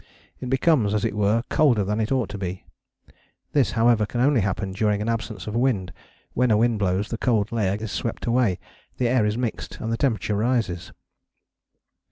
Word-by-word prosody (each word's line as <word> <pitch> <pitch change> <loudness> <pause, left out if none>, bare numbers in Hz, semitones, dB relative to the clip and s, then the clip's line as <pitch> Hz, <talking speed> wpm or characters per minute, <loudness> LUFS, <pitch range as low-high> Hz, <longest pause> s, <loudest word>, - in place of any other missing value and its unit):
It 125 - -5
becomes, 130 -6 +2
as 105 - 0
it - - -2
were, 105 +2 +2
colder 130 -10 +3
than 105 +3 -1
it 110 +2 -1
ought 130 -5 +1
to 100 - -6
be. 95 -1 -5 0.9
This, 140 -4 +2
however, 115 -2 +3
can 120 - -4
only 130 -1 +3
happen 100 0 -2
during 105 +1 0
an 105 - -3
absence 110 -4 -3
of 105 - -5
wind: 115 -8 0 0.4
when 125 0 +2
a 110 - +4
wind 115 -1 +2
blows 95 0 0
the 115 - -4
cold 110 -4 +1
layer 100 -4 0
is 110 -1 -5
swept 115 - -3
away, 115 -6 +2 0.4
the 125 - +1
air 120 -3 +2
is 105 +2 -1
mixed 120 -3 -4
and 115 +1 -3
the - - -1
temperature 110 -6 0
rises. 110 -6 -1
110 Hz, 195 wpm, -24 LUFS, 105-120 Hz, 0.9 s, a